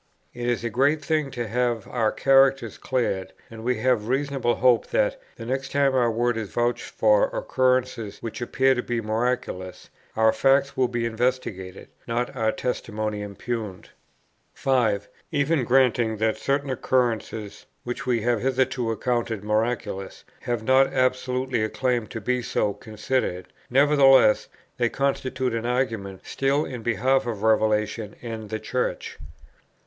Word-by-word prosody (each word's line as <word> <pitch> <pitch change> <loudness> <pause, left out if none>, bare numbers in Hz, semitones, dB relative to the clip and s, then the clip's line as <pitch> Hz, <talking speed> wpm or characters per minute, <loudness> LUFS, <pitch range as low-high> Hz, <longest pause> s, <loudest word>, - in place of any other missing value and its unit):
It 120 0 -3
is 120 -1 -1
a 115 - -2
great 140 +6 +2
thing 155 -3 0
to 120 -3 -4
have 120 -1 -1
our 115 -3 0
characters 135 -4 +3
cleared; 115 -7 -2 0.2
and 110 -1 -9
we 125 +1 +1
may 125 +4 +1
reasonably 125 +2 0
hope 125 -1 +3
that, - - 0
the - - -8
next 135 +2 -3
time 140 -1 +2
our 125 -2 +3
word 120 +1 0
is 110 -3 -4
vouched 120 +3 -1
for - - +3
occurrences 130 - 0
which 115 +1 -7
appear 130 +2 +2
to 125 - -1
be 120 -1 -2
miraculous, 110 -4 -3 0.2
our 110 0 +4
facts 140 +1 +2
will 130 -1 +2
be 120 -1 -2
investigated, 110 -6 -3 0.2
not 120 +1 -2
our 110 0 +1
testimony 110 -4 -3
impugned. 105 -1 -5 0.7
5. 115 -7 +1 0.2
Even 145 -1 +1
granting 120 -3 +2
that 110 +1 +1
certain 140 0 -1
occurrences, 115 -5 -1 0.2
which 120 +1 -5
we 120 -3 +1
have 120 -1 +1
hitherto 130 -2 0
accounted 115 -2 -1
miraculous, 105 -2 -2 0.2
have 120 -2 -3
not 130 +3 +4
absolutely 130 -1 0
a 110 - -1
claim 125 -3 -1
to 115 - -6
be 125 +4 -1
so 105 -3 0
considered, 110 -4 -3 0.2
nevertheless 135 -4 +5 0.3
they 120 -1 +2
constitute 130 -2 -1
an 115 +1 -2
argument 115 -7 -2
still 140 +2 0
in 125 -3 -6
behalf 120 +4 +1
of 110 -3 -4
Revelation 110 -1 +1
and 110 -3 -6
the 110 - -2
Church. 125 +2 -3
120 Hz, 145 wpm, -24 LUFS, 110-130 Hz, 0.7 s, nevertheless